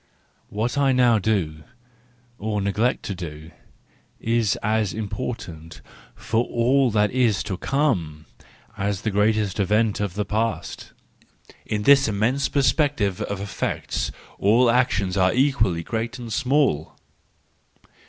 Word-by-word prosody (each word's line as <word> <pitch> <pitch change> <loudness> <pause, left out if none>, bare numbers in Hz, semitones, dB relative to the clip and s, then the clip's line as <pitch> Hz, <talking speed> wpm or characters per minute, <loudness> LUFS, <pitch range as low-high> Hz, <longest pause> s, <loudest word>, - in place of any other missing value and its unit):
—What 115 +7 -2
I 135 -2 +3
now 120 -3 +4
do, 90 -8 -1 0.8
or 105 0 -2
neglect 105 +5 0
to 100 - -4
do, 80 -3 -8 0.7
is 115 -2 +1
as 110 -2 0
important 100 -7 -6 0.4
for 115 +2 0
all 125 +3 +2
that 105 -1 +2
is 120 -5 +1
to 105 -4 -4
come, 90 - -1 0.5
as 100 -1 -2
the 110 - 0
greatest 105 0 +1
event 105 +2 +1
of 100 -3 -3
the 105 0 -1
past: 110 +2 -3 0.7
in 105 -1 -2
this 140 +3 +6
immense 115 +6 0
perspective 140 - +1
of 100 - -3
effects 100 -1 -3 0.3
all 115 +4 +4
actions 105 -6 +1
are 95 +1 +3
equally 110 -11 +2
great 115 +6 -3
and 120 -3 -6
small. 125 - +1
110 Hz, 125 wpm, -23 LUFS, 100-125 Hz, 0.8 s, this